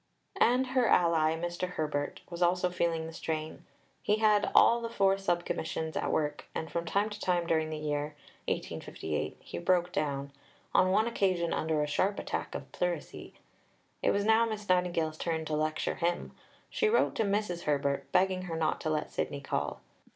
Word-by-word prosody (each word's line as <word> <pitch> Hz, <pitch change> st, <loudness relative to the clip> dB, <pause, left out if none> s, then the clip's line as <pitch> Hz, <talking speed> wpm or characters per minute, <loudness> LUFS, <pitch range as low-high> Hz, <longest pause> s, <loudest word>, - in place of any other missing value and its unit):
And 250 Hz, +2 st, +4 dB
her 255 Hz, -3 st, +3 dB
ally, 160 Hz, -2 st, +4 dB
Mr. 175 Hz, +2 st, -3 dB
Herbert, 150 Hz, -3 st, -2 dB
was 170 Hz, 0 st, -7 dB
also 180 Hz, +1 st, +2 dB
feeling 165 Hz, -2 st, 0 dB
the 165 Hz, -, -7 dB
strain. 155 Hz, -1 st, -4 dB, 0.4 s
He 210 Hz, -, +2 dB
had 215 Hz, -1 st, +3 dB
all 235 Hz, 0 st, +6 dB
the 230 Hz, -, -3 dB
four 195 Hz, -4 st, +3 dB
Sub 175 Hz, -3 st, 0 dB
Commissions 160 Hz, 0 st, -3 dB
at -, -, -1 dB
work, 150 Hz, -1 st, -1 dB
and 160 Hz, -, -4 dB
from 170 Hz, 0 st, -2 dB
time 200 Hz, +5 st, 0 dB
to 205 Hz, -, -7 dB
time 175 Hz, -3 st, +1 dB
during 160 Hz, -1 st, +1 dB
this 155 Hz, -1 st, -5 dB
year 150 Hz, 0 st, -2 dB, 0.3 s
(1858) 80 Hz, -1 st, -3 dB
he -, -, -6 dB
broke 180 Hz, -, +2 dB
down 140 Hz, -3 st, -2 dB, 0.4 s
on 185 Hz, -, +5 dB
one 215 Hz, +4 st, +3 dB
occasion 185 Hz, -7 st, +1 dB
under 155 Hz, -1 st, 0 dB
a -, -, -1 dB
sharp 190 Hz, +8 st, +1 dB
attack -, -, -4 dB
of -, -, -7 dB
pleurisy. -, -, -3 dB, 0.7 s
It -, -, +2 dB
was 200 Hz, 0 st, +1 dB
now 220 Hz, +1 st, +5 dB
Miss 215 Hz, -2 st, -3 dB
Nightingale's 175 Hz, -3 st, +1 dB
turn 160 Hz, -2 st, -1 dB
to 155 Hz, -, -1 dB
lecture 155 Hz, 0 st, 0 dB
him. 175 Hz, +1 st, -1 dB, 0.4 s
She 440 Hz, -, +2 dB
wrote 465 Hz, -, +3 dB
to -, -, +2 dB
Mrs. 200 Hz, -4 st, -1 dB
Herbert, 140 Hz, -1 st, 0 dB
begging 185 Hz, 0 st, +2 dB
her 165 Hz, -2 st, -4 dB
not 160 Hz, -, 0 dB
to 155 Hz, -, -1 dB
let 155 Hz, -1 st, -1 dB
Sidney 140 Hz, -, -3 dB
call. 135 Hz, -, -2 dB
170 Hz, 180 wpm, -30 LUFS, 155-195 Hz, 0.7 s, all